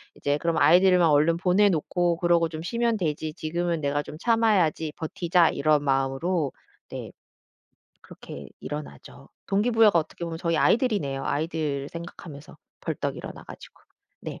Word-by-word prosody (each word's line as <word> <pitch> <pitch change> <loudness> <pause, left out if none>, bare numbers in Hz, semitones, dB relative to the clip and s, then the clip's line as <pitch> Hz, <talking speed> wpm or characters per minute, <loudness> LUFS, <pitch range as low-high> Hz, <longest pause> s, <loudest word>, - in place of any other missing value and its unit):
이제 145 +1 -1
그럼 165 +1 -1
'아이들만 180 0 +5
얼른 150 +3 +4
보내 190 +3 +3
놓고 175 0 0
그러고 170 -2 +2
좀 160 0 -7
쉬면 235 +5 0
되지. 155 -4 -3
지금은 170 +1 -2
내가 145 +1 0
좀 150 - -10
참아야지 190 -9 +1
버티자.' 170 +1 +1
이런 150 0 +1
마음으로 135 +4 0 0.4
네 - - -7 0.9
그렇게 - - -11
일어나죠. 150 -1 -8 0.2
동기부여가 210 -2 +3
어떻게 165 +2 -4
보면 165 -1 -5
저희 165 -1 0
아이들이네요. 150 - +1
아이들 145 -2 -2
생각하면서 165 -3 -10 0.3
벌떡 - - -3
일어나 - - -8
가지고. - - -13 0.4
네. - - -7
165 Hz, 350 characters per minute, -25 LUFS, 150-180 Hz, 0.9 s, 아이들만